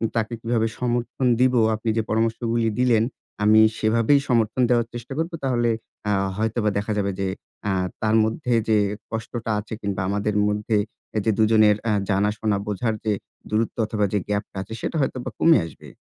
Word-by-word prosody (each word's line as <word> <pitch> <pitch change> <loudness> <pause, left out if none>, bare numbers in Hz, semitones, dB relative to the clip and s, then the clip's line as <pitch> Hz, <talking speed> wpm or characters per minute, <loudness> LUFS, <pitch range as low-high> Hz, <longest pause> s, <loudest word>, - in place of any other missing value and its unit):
তাকে 115 0 -1
কিভাবে 115 -1 +1
সমর্থন 120 +1 -1
দিবো? 130 -2 +4 0.2
আপনি 110 +1 -3
যে - - +3
পরামর্শগুলো 115 +1 0 0.2
দিলেন 120 -3 +4 0.4
আমি 110 +1 +6 0.2
সেভাবেই 115 +6 +3
সমর্থন 115 +1 +2
দেওয়ার 120 -2 +2
চেষ্টা 120 +2 -7
করবো। 165 +1 -2
তাহলে 120 -3 +1 0.4
অ্যা 105 - +1 0.2
হয়তোবা 110 0 0
দেখা 105 +2 -2
যাবে 100 -1 0
যে, 95 - 0 0.4
অ্যা 105 -1 0 0.3
তার 110 0 +2
মধ্যে 120 +3 -1 0.2
যে 110 - +5 0.3
কষ্টটা 115 0 -4
আছে, 105 +1 -8
কিংবা 100 -2 -2
আমাদের 105 +1 -1
মধ্যে 105 +1 0 0.5
যে 110 - +4
দুজনের 110 -1 +5
অ্যা 110 - +2 0.2
জানা-শোনা, 105 +1 +1
বোঝার 105 +3 -1
যে 110 - +2 0.4
দূরত্ব 110 +1 -1
অথবা, 105 -1 0
যে 105 - +2
গ্যাপটা 105 0 -2
আছে 105 +4 -8
সেটা - - -3
হয়তোবা 130 -2 -2
কমে 165 0 +6
আসবে। 80 - -12
110 Hz, 165 wpm, -23 LUFS, 105-120 Hz, 0.5 s, আমি